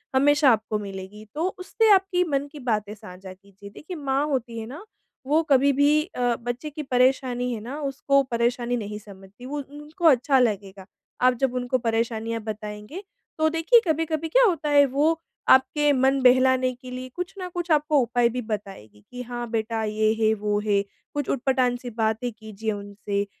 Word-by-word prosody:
हमेशा 290 +1 +5
आपको 220 -1 0
मिलेंगी, 200 +1 -8
तो 325 +4 0
उससे 440 +4 +1
आपकी 380 -2 +3
मन 285 -4 -1
की 300 - -10
बातें 215 -5 -2
साझा 185 -2 -11
कीजिए। 200 +1 -15
देखिए 315 - -9
माँ 275 -1 0
होती 245 -5 -3
है 220 - -5
ना, 295 +10 -9 0.4
वो 300 +4 +3
कभी 275 +1 +5
भी 290 +2 +3
अ, 245 -7 -1
बच्चे 245 +6 -5
की 300 +1 -6
परेशानी 250 -1 +1
है 225 - -4
ना, 260 +7 -6
उसको 275 0 +1
परेशानी 240 0 -1
नहीं 210 -1 -5
समझती, 200 +3 -14
वो 290 +2 -4
उनको 295 +5 -8
अच्छा 270 -1 +5
लगेगा 200 -5 -1 0.4
आप 255 0 +5
जब 260 -2 +1
उनको 250 +1 0
परेशानियाँ 230 -1 -2
बताएँगे। 210 - -7 0.3
तो 315 0 +3
देखिए, 330 +9 +4
कभी-कभी 320 0 -1
क्या - - +5
होता 330 -7 0
है, 285 -1 +6
वो 295 +5 +1 0.3
आपके 295 +3 +4
मन 265 +1 +2
बहलाने 255 0 +4
के 250 +1 -12
लिए 255 0 -6
कुछ 360 +1 -5
ना 370 -1 -5
कुछ 350 0 -5
आपको 300 0 +3
उपाय 240 0 +2
भी 250 +1 -4
बताएँगी 195 - -7
कि, 250 0 -7
"हाँ 240 -1 -6
बेटा, 225 0 -1
ये 215 0 +1
है, 220 0 +4
वो 210 -1 -1
है।" 200 -1 +2 0.3
कुछ 290 -2 -3
ऊट 255 - -1
पटांग 255 -2 +2
सी 245 - -7
बातें 225 +1 -1
कीजिए 220 0 -5
उनसे, 205 0 -4
250 Hz, 180 wpm, -24 LUFS, 220-290 Hz, 0.4 s, है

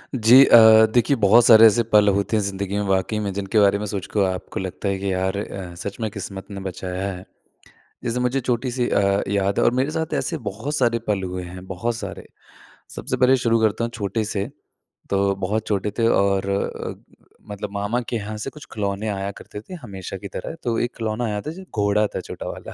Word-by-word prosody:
जी 115 +1 +5
अ, 110 -1 +8
देखिए 125 +4 +3
बहुत 115 +4 +6
सारे 115 -1 +9
ऐसे 115 +2 +5
पल 105 -1 +6
होते 100 +3 0
हैं - - +1
ज़िंदगी 100 0 -3
में 105 - 0
वाक़ई 95 +3 0
में 100 -2 -2
जिनके 100 +2 0
बारे 100 0 +4
में 105 - -3
सोच 100 -2 -4
के 105 - +3
आपको 90 - -6
लगता 95 +2 -5
है 100 - -1
कि 100 0 -2
यार 95 +1 -1
अ, 95 -3 -6
सच 100 +3 -7
में 110 - -1
किस्मत 100 -2 -7
ने 100 - -6
बचाया 95 +1 -4
है। 90 0 -9 0.8
जैसे 120 +1 -1
मुझे 125 +2 0
छोटी-सी 125 0 -1
अ, 100 0 +2
याद 100 0 0
है - - +3
और - - +5
मेरे 130 +3 +1
साथ 160 0 -3
ऐसे 165 - -2
बहुत 110 +9 -5
सारे 120 -4 +2
पल 100 -2 0
हुए 90 0 -4
हैं, 90 +1 -10
बहुत 95 +6 -3
सारे। - - -7 0.7
सबसे 130 - -3
पहले 130 +1 +4
शुरू 115 -2 +1
करता 110 +1 +1
हूँ 115 - -3
छोटे-से 105 -1 -2 0.6
तो 100 0 +2
बहुत 100 +3 -2
छोटे 105 0 0
थे 115 - +3
और 100 -2 +2
अ, 100 0 -3 0.6
मतलब 105 0 -5
मामा 105 +4 -1
के 120 - -1
यहाँ 110 0 -5
से 135 - -4
कुछ 150 0 -13
खिलौने 100 0 -2
आया 100 -1 -3
करते 105 - -9
थे 185 - -11
हमेशा 95 -5 -7
की 100 - -8
तरह, 95 - -6
तो 115 -2 -1
एक 120 0 -1
खिलौना 115 +1 -2
आया 105 -1 -2
था 150 - -5
जो 190 +3 -10
घोड़ा 105 0 +2
था - - -2
छोटा - - -8
वाला - - -9
105 Hz, 215 wpm, -22 LUFS, 100-115 Hz, 0.8 s, सारे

